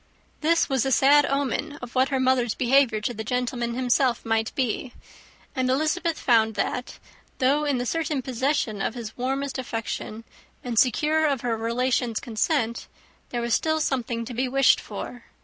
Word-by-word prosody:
This 330 +2 +2
was 265 -4 +1
a 270 - -1
sad 285 +3 +5
omen 275 +1 -1
of 245 -1 -9
what 260 +1 +2
her 270 -2 0
mother's 255 -3 +2
behaviour 255 -3 +3
to 240 - -2
the 220 -1 -5
gentleman 240 0 -2
himself 250 -1 +1
might 225 0 0
be; 255 0 -2 0.6
and 255 -1 0
Elizabeth 310 +5 0
found 220 -3 +3
that, 250 +4 -3 0.4
though 280 +4 +2
in 285 -3 +1
the 245 - -2
certain 305 -1 -1
possession 255 -4 -1
of 225 - -2
his 225 -3 -7
warmest 270 +2 -2
affection, 225 -2 -5 0.4
and 240 -3 0
secure 310 +5 +3
of 275 -4 0
her 240 -2 -1
relations' 235 +1 0
consent, 235 +1 -1 0.4
there 240 - -3
was 235 0 -1
still 315 0 +1
something 240 -5 -1
to 245 - -7
be 255 +3 -1
wished 275 +1 +4
for. 245 -1 -8
255 Hz, 165 wpm, -25 LUFS, 235-275 Hz, 0.6 s, sad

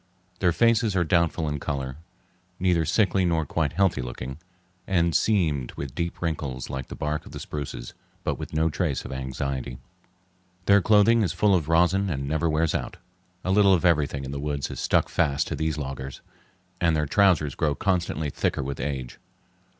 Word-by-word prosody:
Their 90 -2 +3
faces 115 +3 +3
are 90 - +3
doubtful 85 -1 +1
in 75 -1 -2
color, 70 -2 -4 0.6
neither 90 -3 +2
sickly 95 +3 +2
nor 85 -3 +1
quite 75 0 -1
healthy 95 -7 +2
looking, 60 +3 -6 0.5
and 85 -3 +2
seamed 80 - +1
with 70 -3 -6
deep 85 +1 -3
wrinkles 70 -7 -3
like 65 -1 -4
the - - -8
bark 75 +1 -3
of - - -12
the - - -6
spruces, 70 -5 -6 0.3
but - - -2
with - - -6
no 80 +1 +2
trace 80 -4 -1
of - - -7
anxiety. 65 -1 -4 0.9
Their 100 0 +6
clothing 110 +3 +5
is 95 -7 0
full 105 -2 +3
of 85 -5 +1
rosin 90 +4 +3
and 70 -4 -3
never 80 +3 0
wears 80 0 +1
out. - - -3 0.5
A 95 - 0
little 100 -1 +6
of 90 - -1
everything 75 -5 +2
in 65 - -6
the 70 - -4
woods 70 -1 -3
is - - -6
stuck - - +2
fast 75 -2 +1
to 80 - -2
these 80 +1 -1
loggers, 65 -2 -6 0.6
and 85 -2 +2
their 75 -1 +1
trousers 85 -5 +3
grow 75 -3 0
constantly 85 -4 -1
thicker 70 - -1
with 70 +1 -5
age. 65 -4 -4
80 Hz, 180 wpm, -25 LUFS, 70-90 Hz, 0.9 s, Their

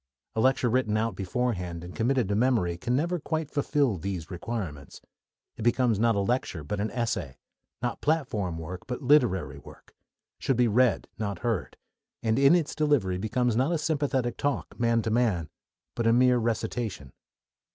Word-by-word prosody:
A 110 - +1
lecture 130 0 +3
written 115 -3 +1
out 110 -2 -1
beforehand 90 -4 -2
and 90 +1 -9
committed 125 -1 +1
to 100 - 0
memory 110 -7 +2
can 95 +8 -1
never 170 +5 0
quite 160 -1 -3
fulfil 140 -6 +1
these 90 -1 -5
requirements. 85 -7 -5 0.6
It - - -7
becomes 120 -1 +2
not 115 0 +3
a 100 - +1
lecture, 100 - -1
but 100 +8 -3
an 105 +2 -1
essay; 115 - -2 0.5
not 120 - -2
platform 110 - 0
work, 85 +3 -7
but 125 +2 -4
literary 95 - +3
work; - - -15 0.5
should 135 - 0
be 125 -1 +4
read, 120 +3 +2
not 100 -2 -2
heard; 115 -2 -2 0.5
and 110 +2 +2
in 140 +4 +6
its 165 -4 0
delivery 140 -13 +1
becomes 120 +3 0
not 130 +7 +2
a 170 - +2
sympathetic 145 -6 -1
talk, 145 -2 -2
man 115 -1 +2
to 110 - -1
man, 105 -9 +1 0.4
but 115 -1 -1
a 115 - +5
mere 125 0 +4
recitation. 110 - -3
115 Hz, 170 wpm, -27 LUFS, 95-130 Hz, 0.6 s, in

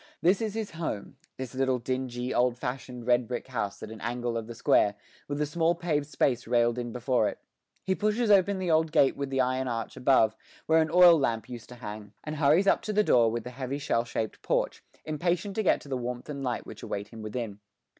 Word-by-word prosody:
This 185 +6 +3
is 220 -2 -2
his 220 -2 -3
home, 160 -11 -5 0.2
this 130 -1 -6
little 130 -1 +1
dingy, 125 0 -3
old 125 0 +2
fashioned 125 -1 -5
red 120 -1 +3
brick 125 -1 -4
house 115 -6 -3
at 110 - -7
an 110 -2 -9
angle 120 0 -2
of 115 -1 -3
the 120 - -8
square, 105 -2 +3 0.3
with 145 0 -3
a 150 - +2
small 165 +3 +1
paved 155 -4 -1
space 125 -5 0
railed 120 0 +2
in 120 -1 -4
before 125 -2 +1
it. - - -8 0.5
He 190 - +1
pushes 215 +3 +1
open 200 0 +4
the 185 -2 -1
old 160 0 +3
gate 140 -4 +4
with 140 -1 -3
the 135 -1 +1
iron 130 +1 0
arch 115 -2 -3
above, 125 -4 +3 0.3
where 160 0 +4
an 160 - 0
oil 175 -1 +8
lamp 115 -5 -1
used 120 -2 -9
to 125 - -10
hang, 105 -3 -8
and 155 0 -5
hurries 155 +6 +4
up - - +3
to 215 - -3
the 210 +1 +4
door 120 - +4
with 115 0 -3
the 125 - -7
heavy 130 +2 -4
shell 115 -4 0
shaped 115 -2 -4
porch, - - -1 0.2
impatient 175 +5 -1
to - - +3
get 200 - +3
to - - -13
the 135 - -2
warmth 125 +2 -5
and 140 -2 -5
light 125 -2 -2
which - - -10
await 100 0 -5
him 115 -1 -10
within. 110 -1 -5
130 Hz, 230 wpm, -28 LUFS, 120-160 Hz, 0.5 s, oil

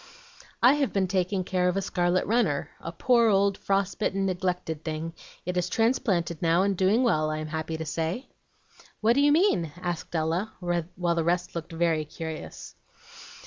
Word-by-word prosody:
"I 250 +3 +8
have 285 -2 0
been 195 -2 +1
taking 185 0 0
care 180 0 0
of 180 - -1
a - - +1
scarlet 175 0 +1
runner, 210 -11 +1
a 165 - -5
poor 235 +6 +3
old 200 -1 +3
frost 195 0 -1
bitten, 195 -2 0
neglected 180 -4 -2
thing; 160 +1 -4 0.3
it 180 +1 -2
is 180 0 0
transplanted 190 -8 +1
now, 170 +2 +3
and 200 0 +1
doing 195 +7 +3
well, 155 -10 +2
I'm 155 0 -3
happy 160 +1 -4
to 160 - -5
say." 165 - -2 0.8
"What 225 +2 +4
do 280 - +3
you 290 0 +5
mean?" 295 - +3
asked 175 -1 -4
Ella, 165 +6 -1
while 175 0 -1
the 165 -1 0
rest 175 +2 0
looked 170 0 -6
very 165 -1 +1
curious. 160 +1 -7
180 Hz, 175 wpm, -27 LUFS, 165-200 Hz, 0.8 s, I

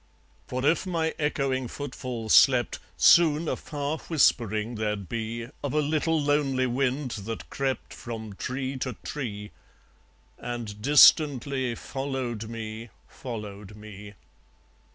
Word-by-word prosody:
For 130 +1 -3
if 170 +5 +2
my 165 -3 0
echoing 135 -4 0
footfall 125 -3 -6
slept, 125 +1 +5 0.2
Soon 165 -1 +5
a - - 0
far 145 +1 -4
whispering 115 - +1
there'd 105 -3 -3
be 115 +2 -4 0.2
Of 145 - -2
a - - +4
little 155 +2 +1
lonely 145 -3 +1
wind 130 +1 -1
that 110 +1 -6
crept 135 -1 -2
From 110 -3 -7
tree 130 +5 -4
to 130 -1 -3
tree, 105 -8 -5 0.9
and 115 -4 -6
distantly 140 -2 +5
Followed 130 -5 -4
me, 115 0 -6 0.2
followed 105 -4 -8
me. 105 -1 -11
125 Hz, 115 wpm, -27 LUFS, 110-145 Hz, 0.9 s, slept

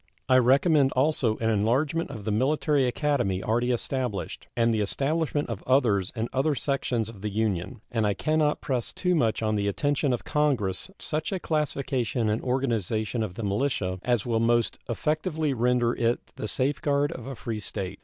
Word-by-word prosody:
I 130 - +5
recommend 140 +3 +4
also 130 -5 +2
an 115 0 +1
enlargement 130 +10 +1
of 110 -7 -8
the 110 - 0
Military 140 +4 +2
Academy 120 -8 0
already 120 +3 +1
established, 125 -3 -2
and 115 -1 +3
the 110 - +1
establishment 145 +7 0
of 115 -5 -5
others 110 -8 +3
in 115 0 -1
other 140 +3 +1
sections 130 -5 -1
of 110 -4 -11
the 105 - -2
Union; 105 -3 -2
and 110 -3 +1
I 100 - +1
can 155 0 0
not 150 -1 +1
press 125 -4 -1
too 180 -1 0
much 115 -9 +1
on 110 0 +1
the 100 0 0
attention 145 +6 +1
of 120 - -1
Congress 130 - 0
such 155 +3 -3
a 190 - -1
classification 135 -8 -1
and 105 +2 0
organization 115 -3 -1
of 105 -5 -3
the 115 - -5
militia 100 -3 -1
as 120 -4 0
will 115 -2 +1
most 115 0 +2
effectually 155 - 0
render 120 -1 +2
it 115 0 -1
the 110 - -4
safeguard 140 +5 +1
of 130 -6 -7
a 135 - -5
free 115 -1 -4
state. 95 -2 -5
120 Hz, 180 wpm, -27 LUFS, 110-145 Hz, -, I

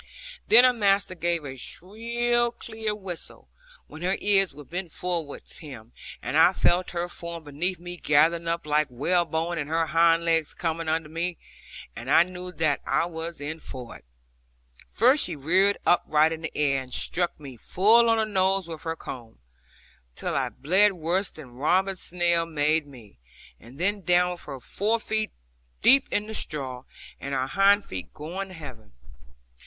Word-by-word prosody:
Then 235 +3 +8
her 255 0 +6
master 200 -4 +2
gave 170 -2 -1
a 135 -1 -7
shrill 235 - -1
clear 220 -2 -4
whistle, 190 -5 -8 0.4
when 155 - -12
her 185 +2 0
ears 195 -2 +3
were 145 +1 -12
bent 175 +3 -5
towards 170 -5 -3
him, 120 -7 -11 0.3
and - - -3
I - - +6
felt 180 +1 +2
her 175 0 -3
form 170 -1 -4
beneath 160 +5 -3
me 175 0 -8
gathering 165 +2 +2
up 170 -1 -2
like 150 0 +2
whalebone, 165 +5 0
and 145 -1 -4
her 165 +1 +1
hind 165 +1 +3
legs 165 -2 +1
coming 165 -1 -2
under 160 0 -1
her, 165 +3 -3 0.6
and 120 +3 -7
I 165 - +7
knew 180 0 -7
that 155 -4 0
I - - +1
was 165 0 -6
in 150 +3 -5
for 125 -6 -6
it. - - -15 0.9
First 255 +7 +4
she - - -4
reared 185 +8 +2
upright 155 -2 +3
in 160 - -7
the 165 - -6
air, 140 -2 +1
and 130 -1 -11
struck 175 +6 -1
me 140 -4 -10
full 220 - +4
on 225 - +3
the 220 - +1
nose 190 -3 +1
with 160 -2 -7
her 165 0 -3
comb, 120 -7 -9 0.8
till - - -4
I - - 0
bled 190 +8 +3
worse 180 +3 -1
than 140 -6 -13
Robin 185 +9 +1
Snell 170 -2 0
made 155 -1 +1
me; 115 - -15 0.4
and 125 +6 -15
then 200 +3 0
down 180 0 +3
with 175 - -7
her 135 -2 -7
fore 210 - +1
feet 220 -1 -1 0.5
deep 275 +2 +6
in 205 - -1
the 220 - -7
straw, 130 -9 -5 0.3
and 140 0 -4
her 130 0 0
hind 200 +7 +3
feet 95 -1 -7
going 175 +6 -5
to 190 - -12
heaven. 130 - -11
170 Hz, 175 wpm, -26 LUFS, 150-190 Hz, 0.9 s, Then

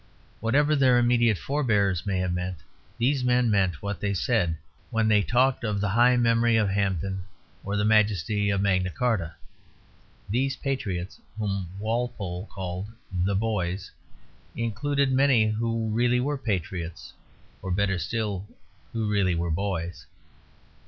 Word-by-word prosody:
Whatever 145 +7 +2
their 130 -3 +4
immediate 120 -3 +3
forbears 105 - 0
may 100 -2 0
have 90 -1 0
meant, 90 0 -3 0.4
these 130 +2 +1
men 125 -2 +3
meant 95 -6 +1
what 100 -3 -3
they 100 +1 -1
said 90 -6 +1 0.3
when 115 -1 +1
they 105 -1 +4
talked 125 +4 +2
of 105 -3 -1
the 100 0 0
high 120 +4 +4
memory 115 -1 +3
of 110 -3 +2
Hampden 95 -1 -1 0.4
or 100 +1 -2
the 105 - +1
majesty 105 -1 +2
of 100 -1 +1
Magna 95 -2 +2
Carta. 95 -6 -1 0.9
Those 130 +5 0
Patriots 105 -12 -3 0.2
whom 100 -4 -2
Walpole 110 -4 -3
called 95 0 -5 0.2
the 95 +2 0
Boys 95 -3 -2 0.6
included 130 +5 0
many 130 -4 +4
who 115 +1 -1
really 120 +2 +2
were 145 +4 0
patriots 90 - -4 0.5
or 95 - -5
better 95 0 +1
still, 100 +3 -3 0.5
who 110 -2 -1
really 100 -4 +2
were 85 0 -1
boys. 90 -1 -3
105 Hz, 140 wpm, -26 LUFS, 95-120 Hz, 0.9 s, their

